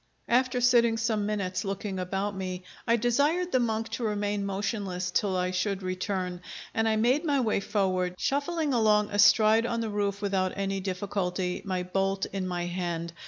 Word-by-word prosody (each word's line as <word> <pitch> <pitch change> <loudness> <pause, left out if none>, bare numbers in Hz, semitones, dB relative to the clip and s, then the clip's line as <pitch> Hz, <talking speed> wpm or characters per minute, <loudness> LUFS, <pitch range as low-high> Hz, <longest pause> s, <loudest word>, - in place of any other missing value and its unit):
After 250 +1 +2
sitting 235 -2 +4
some 220 -2 0
minutes 200 -3 -2
looking 195 -1 -3
about 195 +2 -2
me, 185 -1 -4 0.2
I 235 - +5
desired 285 +10 +1
the 255 - +3
monk 225 -1 -1
to 230 +2 -4
remain 205 -1 -1
motionless 195 -2 -2
till 195 -3 +1
I 180 0 0
should 190 +1 -1
return, 185 -1 -3 0.3
and 225 0 +1
I 220 - +2
made 245 +8 +2
my 290 -4 +1
way 225 -5 +1
forward, 185 -3 0
shuffling 290 - 0
along 210 -3 +3
astride 215 +2 +5
on 235 -1 -1
the 225 - -2
roof 200 -1 -1
without 195 -2 0
any 195 0 -1
difficulty, 185 -1 -2
my 185 -2 -1
bolt 195 +1 0
in 190 -2 -2
my 175 -1 -2
hand. 175 -1 -3
205 Hz, 170 wpm, -28 LUFS, 185-225 Hz, 0.3 s, I